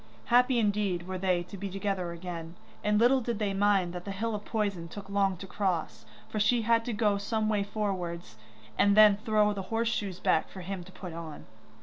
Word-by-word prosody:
Happy 250 +1 +5
indeed 205 -5 0
were 185 0 -4
they 180 -2 +1
to 180 - -10
be 200 +1 -5
together 195 -2 -2
again, 170 -1 -7 0.3
and 210 0 +2
little 255 +3 +4
did 235 -2 -2
they 205 -2 -1
mind 195 -3 +2
that 180 -1 -6
the 200 - -7
hill 220 +3 -2
of 210 -1 -4
poison 200 -7 -2
took 200 +4 -9
long 195 -2 +1
to 195 - -8
cross, 180 - -2 0.2
for 215 - -3
she 230 +2 +3
had 230 +1 +3
to 240 - -3
go 210 -2 +1
some 215 +1 -1
way 210 -2 +1
forwards, 185 - -3 0.4
and 200 0 +4
then 210 -1 +8
throw 215 -1 +2
the 200 - -4
horse 230 0 +1
shoes 200 -5 -3
back 160 - +2
for 190 - -9
him 185 0 -5
to 190 - -14
put 185 -2 -8
on. 165 -2 -8
200 Hz, 215 wpm, -29 LUFS, 180-215 Hz, 0.4 s, then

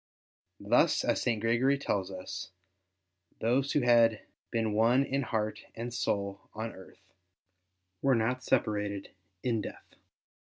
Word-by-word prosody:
Thus, - - +3
as - - +1
St. 115 -3 +1
Gregory 120 +5 +2
tells 100 -8 -1
us, 95 0 -6 0.9
those 130 +5 +1
who 145 - +3
had 115 -3 +4 0.2
been 115 -2 0
one 115 +5 +4
in 135 +1 -1
heart 110 -4 -2 0.2
and 120 +1 -5
soul 100 -4 -2
on 110 +1 -4
earth 95 - -16 0.9
were 135 -2 +4
not 125 +3 0
separated 105 -6 0 0.3
in 115 -3 +1
death. - - -9
115 Hz, 125 wpm, -30 LUFS, 105-125 Hz, 0.9 s, had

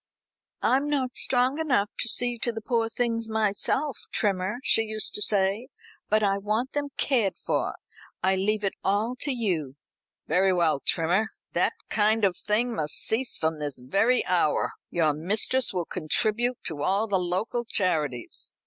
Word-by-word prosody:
'I'm 275 +3 +2
not 260 -4 -1
strong 255 +3 +1
enough 250 -10 +1
to 240 - +2
see 245 0 +2
to 235 - -1
the 225 - -5
poor 230 0 0
things 230 -1 -1
myself, 220 +6 0
Trimmer,' 195 +1 0
she 225 - +4
used 215 -1 -1
to - - -1
say, 205 +3 +1 0.4
'but 215 +1 +3
I 200 -1 +2
want 215 +6 -1
them 290 0 -1
cared 230 -9 +1
for. - - -1 0.5
I 190 +1 +3
leave 210 +3 0
it 195 - 0
all 210 +5 +1
to 290 - 0
you.'" 175 - -2 0.5
"Very 185 +4 +3
well, 165 -5 +2
Trimmer. 175 +9 +1 0.3
That - - +2 0.2
kind 215 0 +3
of 185 -2 +1
thing 230 +6 0
must 150 -7 -1
cease 245 +3 0
from 160 -1 -1
this 145 -2 -2
very 195 - +1
hour. 175 -4 +2 0.2
Your 160 -3 +2
mistress 210 - +1
will 180 -3 -2
contribute 215 +10 +1
to 155 -4 -4
all 200 +7 +1
the 195 -3 +1
local 185 +7 -1
charities. 155 - -2
210 Hz, 160 wpm, -26 LUFS, 180-240 Hz, 0.5 s, she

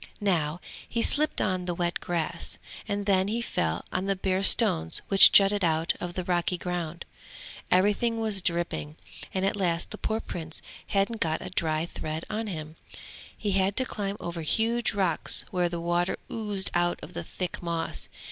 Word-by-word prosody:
Now 175 -6 0 0.3
he 230 -1 0
slipped 305 +1 +4
on 185 -2 0
the 175 -1 -2
wet 175 0 -1
grass, 170 -1 -2 0.3
and 205 -1 -2
then 190 -1 +3
he 225 +3 -1
fell 85 - -1
on 185 +1 0
the 195 - +2
bare 190 0 0
stones 80 - +4
which 195 -1 +8
jutted 200 0 +5
out 160 -1 +2
of 175 0 -5
the 185 - -2
rocky 175 0 0
ground. 175 -2 -4 0.6
Everything 210 +5 +2
was 215 -3 +2
dripping, 170 -3 -2 0.4
and 190 0 0
at 195 - +1
last 175 -4 0
the 215 - -6
poor 220 0 -1
Prince 160 -6 -6 0.2
hadn't 200 +3 0
got 160 -1 0
a - - -7
dry 160 -2 0
thread 160 -1 -5
on 220 +1 -2
him. 155 -4 -6 0.6
He 210 - -1
had 195 +1 +2
to 260 - +3
climb 205 -4 -3
over 170 -1 -5
huge 225 +8 0
rocks 185 -5 +3
where 180 -2 +1
the 170 0 -4
water 175 +1 0
oozed 210 -4 -3
out 175 0 +1
of - - -9
the 85 - -4
thick 180 - -5
moss. 170 -1 -2
180 Hz, 175 wpm, -27 LUFS, 170-205 Hz, 0.6 s, which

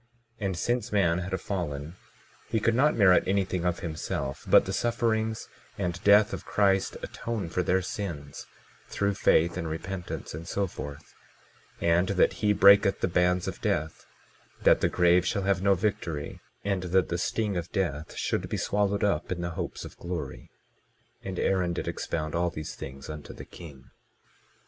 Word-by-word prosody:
22:14 105 - -3
And 95 -3 -3
since 120 +4 -1
man 90 -4 +2
had 95 0 -3
fallen 80 -5 -4 0.5
he 110 - +1
could 115 +2 +2
not 145 +6 +3
merit 95 -4 +5
anything 95 -2 0
of 90 -1 0
himself; 80 -4 -4
but - - +7
the - - -3
sufferings 110 -2 0 0.3
and 90 -2 -3
death 105 +1 +6
of 95 -1 -5
Christ 95 -1 +1
atone 110 -7 -4
for 90 - 0
their 95 +1 +1
sins, 85 -8 -6 0.4
through 100 0 0
faith 85 -2 +3
and 85 -2 -3
repentance, 90 +3 -5
and 80 +2 -7
so 100 +2 0
forth; 70 -5 -8 0.7
and 85 +2 +3
that 100 -2 +3
he 105 -1 +3
breaketh 100 -1 +6
the - - +2
bands 90 0 +2
of - - -5
death, 80 +2 -2 0.6
that - - +5
the - - +3
grave 90 0 +4
shall 100 +2 -1
have 95 -1 +1
no 100 0 +4
victory, 85 -6 -3 0.3
and 100 -2 0
that 95 +1 +2
the 85 - -1
sting 105 +2 -1
of 85 -1 -4
death 80 -6 -2
should - - -1
be - - -2
swallowed 100 0 0
up 100 -6 0
in 90 -1 -2
the 85 0 -3
hopes - - -5
of - - -11
glory; 85 -6 -6 0.7
and 95 -2 -6
Aaron 90 -2 +1
did - - -4
expound 80 -2 -3
all 85 +1 +1
these 80 -1 -6
things 70 0 -9
unto 75 -1 -8
the - - -10
king. 70 -7 -13
90 Hz, 175 wpm, -28 LUFS, 85-100 Hz, 0.7 s, but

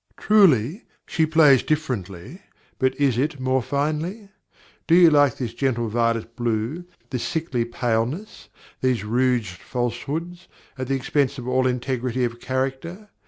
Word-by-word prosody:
Truly, 185 - +3 0.2
she 160 -2 0
plays 155 -5 +5
differently; 125 - -3 0.4
but 130 0 0
is 135 -4 +2
it 145 +1 -1
more 130 0 +1
finely? 155 - -2 0.6
Do 165 - +5
you 175 -2 +7
like 145 -4 +4
this 120 -3 -4
gentle 120 -3 -1
violet 115 0 -1
blue, 120 +8 -2 0.3
this 125 -3 -2
sickly 140 -7 -2
paleness, 120 - -3 0.3
these 130 -4 +1
rouged 115 -4 0
falsehoods, 145 +9 -4 0.3
at 130 -1 -5
the 135 - 0
expense 140 +1 0
of 125 -1 -7
all 130 0 +2
integrity 125 0 -1
of 120 -1 -2
character? 135 - -4
130 Hz, 135 wpm, -23 LUFS, 120-155 Hz, 0.6 s, you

